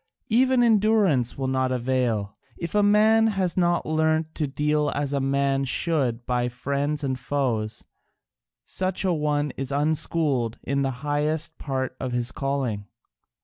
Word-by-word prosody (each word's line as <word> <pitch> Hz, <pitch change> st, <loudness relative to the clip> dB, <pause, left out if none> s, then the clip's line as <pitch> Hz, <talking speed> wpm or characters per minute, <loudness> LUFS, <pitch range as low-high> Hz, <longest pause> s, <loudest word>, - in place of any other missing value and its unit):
Even 250 Hz, +2 st, +4 dB
endurance 210 Hz, -, +3 dB
will 135 Hz, -, -2 dB
not 130 Hz, 0 st, 0 dB
avail, 120 Hz, -5 st, -1 dB, 0.2 s
if 170 Hz, -, -5 dB
a 210 Hz, -, +4 dB
man 215 Hz, +2 st, +5 dB
has 195 Hz, -5 st, 0 dB
not 175 Hz, -1 st, +1 dB
learnt 160 Hz, 0 st, +1 dB
to 150 Hz, -, -2 dB
deal 150 Hz, +2 st, 0 dB
as 145 Hz, 0 st, -1 dB
a 140 Hz, -, +1 dB
man 135 Hz, 0 st, +1 dB
should 130 Hz, -4 st, -1 dB
by 125 Hz, -1 st, 0 dB
friends 140 Hz, +4 st, -2 dB
and 130 Hz, -2 st, -2 dB
foes: 125 Hz, -5 st, -2 dB, 0.8 s
such 185 Hz, +1 st, -2 dB
an 185 Hz, -, +2 dB
one 150 Hz, -1 st, 0 dB
is 135 Hz, 0 st, -4 dB
unschooled 145 Hz, -4 st, 0 dB
in 140 Hz, +1 st, -1 dB
the 135 Hz, -, +1 dB, 0.2 s
highest 150 Hz, +2 st, -1 dB
part 130 Hz, -2 st, -3 dB
of 125 Hz, -1 st, -3 dB
his 120 Hz, 0 st, -1 dB
calling. 135 Hz, -8 st, -2 dB
145 Hz, 145 wpm, -25 LUFS, 130-165 Hz, 0.8 s, man